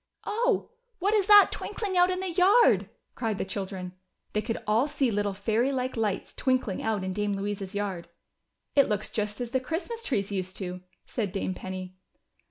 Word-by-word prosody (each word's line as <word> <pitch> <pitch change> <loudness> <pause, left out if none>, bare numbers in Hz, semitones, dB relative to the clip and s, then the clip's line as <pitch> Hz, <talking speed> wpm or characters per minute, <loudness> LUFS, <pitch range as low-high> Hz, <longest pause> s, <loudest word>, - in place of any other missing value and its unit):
"Oh! 460 +1 0 0.3
what 400 +3 +1
is 410 -3 +3
that 415 -1 +9
twinkling 400 -4 -3
out 355 0 +5
in 370 0 -1
the 380 -2 -2
yard?" 390 +7 +5 0.2
cried 225 -4 -2
the - - -2
children. 190 -2 -5 0.4
They 210 - +1
could 225 +2 -2
all 220 +6 +3
see 280 -4 +1
little 205 -1 0
fairy 225 +6 +1
like 255 -1 -2
lights 215 -4 -1
twinkling 255 -7 0
out 215 -3 -1
in 190 0 -2
Dame 205 +1 -1
Louisa's 200 0 -4
yard. 195 -4 -3 0.7
"It 280 - +5
looks 210 -1 0
just 210 -1 -2
as 240 -1 -4
the 260 - +2
Christmas 345 - -4
trees 205 - -1
used 185 -2 -3
to," 180 -1 -5 0.2
said 210 -6 -3
Dame 195 -1 -2
Penny. 185 0 -7
215 Hz, 180 wpm, -28 LUFS, 195-305 Hz, 0.7 s, that